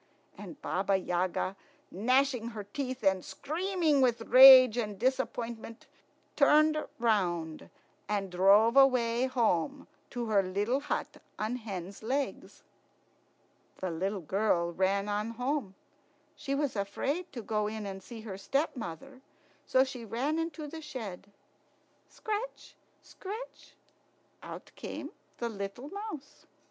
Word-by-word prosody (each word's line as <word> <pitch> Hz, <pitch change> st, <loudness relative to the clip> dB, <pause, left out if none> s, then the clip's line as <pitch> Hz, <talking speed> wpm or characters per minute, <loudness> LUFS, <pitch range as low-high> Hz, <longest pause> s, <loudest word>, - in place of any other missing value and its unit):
And 295 Hz, -, -10 dB
Baba 195 Hz, +1 st, +1 dB
Yaga, 185 Hz, +1 st, -1 dB, 0.4 s
gnashing 250 Hz, +3 st, +1 dB
her 210 Hz, -, -4 dB
teeth 255 Hz, +4 st, -5 dB
and 190 Hz, -2 st, +2 dB
screaming 330 Hz, -2 st, 0 dB
with 240 Hz, -3 st, +2 dB
rage 255 Hz, 0 st, +9 dB
and 210 Hz, -4 st, -2 dB
disappointment, 235 Hz, -2 st, -2 dB, 0.5 s
turned 305 Hz, +2 st, +5 dB, 0.2 s
round 175 Hz, -9 st, 0 dB, 0.4 s
and 200 Hz, -3 st, -1 dB
drove 200 Hz, +6 st, +5 dB
away 255 Hz, -2 st, +4 dB
home 245 Hz, -, 0 dB, 0.2 s
to 240 Hz, -2 st, -4 dB
her 210 Hz, -3 st, +3 dB
little 205 Hz, +7 st, 0 dB
hut 295 Hz, -, -3 dB, 0.2 s
on 220 Hz, +4 st, -2 dB
hen's 195 Hz, -4 st, -7 dB
legs. 265 Hz, +5 st, -3 dB, 1.1 s
The 185 Hz, -2 st, -3 dB
little 190 Hz, +4 st, -2 dB
girl 175 Hz, -1 st, 0 dB
ran 195 Hz, +2 st, +1 dB
on 210 Hz, +2 st, -1 dB
home. 250 Hz, -6 st, -2 dB, 0.6 s
She 280 Hz, -2 st, -3 dB
was 285 Hz, -3 st, -1 dB
afraid 280 Hz, -, -2 dB
to 235 Hz, -4 st, -6 dB
go 210 Hz, 0 st, -1 dB
in 215 Hz, 0 st, -5 dB
and 195 Hz, -1 st, -6 dB
see 225 Hz, +3 st, -10 dB
her 200 Hz, -3 st, -7 dB
stepmother, 260 Hz, -, -3 dB, 0.5 s
so 260 Hz, -, +4 dB
she 260 Hz, -3 st, -6 dB
ran 260 Hz, +9 st, -1 dB
into 325 Hz, -1 st, -4 dB
the 320 Hz, +2 st, -8 dB
shed. 220 Hz, -, -7 dB, 0.8 s
Scratch, 435 Hz, +3 st, -5 dB, 0.3 s
scratch! 435 Hz, +6 st, -9 dB, 0.7 s
Out -, -, -9 dB
came -, -, -7 dB, 0.3 s
the 235 Hz, -, -2 dB
little 200 Hz, +6 st, -6 dB
mouse. 400 Hz, -8 st, -8 dB
230 Hz, 120 wpm, -30 LUFS, 200-275 Hz, 1.1 s, rage